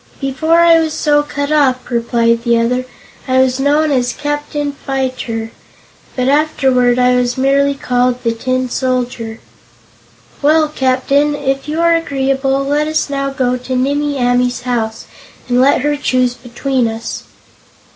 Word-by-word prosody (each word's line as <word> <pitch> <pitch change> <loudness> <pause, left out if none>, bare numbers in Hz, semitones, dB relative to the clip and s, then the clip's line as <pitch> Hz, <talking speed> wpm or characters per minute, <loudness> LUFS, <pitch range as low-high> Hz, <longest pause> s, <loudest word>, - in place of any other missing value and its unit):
"Before 305 +5 +1
I 335 -1 +6
was 320 -1 -1
so 295 -1 +2
cut 285 0 -4
up," 265 -5 +1
replied 235 -1 +1
the 235 -1 +2
other, 250 +2 0 0.4
"I 260 0 +1
was 260 0 +2
known 295 +2 +2
as 245 -3 0
Captain 295 0 -3
Fyter, 255 -5 -4 0.6
but 255 -1 -1
afterward 265 -4 +2
I 250 0 +3
was 245 0 0
merely 275 +1 +2
called 250 -1 0
'The 230 - +1
Tin 255 +2 -2
Soldier.'" 245 -3 -3 1.0
"Well, 305 +1 +3
Captain, 280 +1 +1
if 270 0 -2
you 310 +2 -3
are 335 0 +4
agreeable, 270 -3 0
let 295 +2 0
us 310 -2 -1
now 275 0 -1
go 255 -2 -1
to 255 +1 -5
Nimmie 285 +3 0
Amee's 245 0 +1
house 230 -3 -3 0.4
and 245 0 +2
let 270 0 +3
her 295 +2 0
choose 255 -3 0
between 250 0 -2
us." 225 +1 -6
265 Hz, 145 wpm, -15 LUFS, 250-290 Hz, 1.0 s, I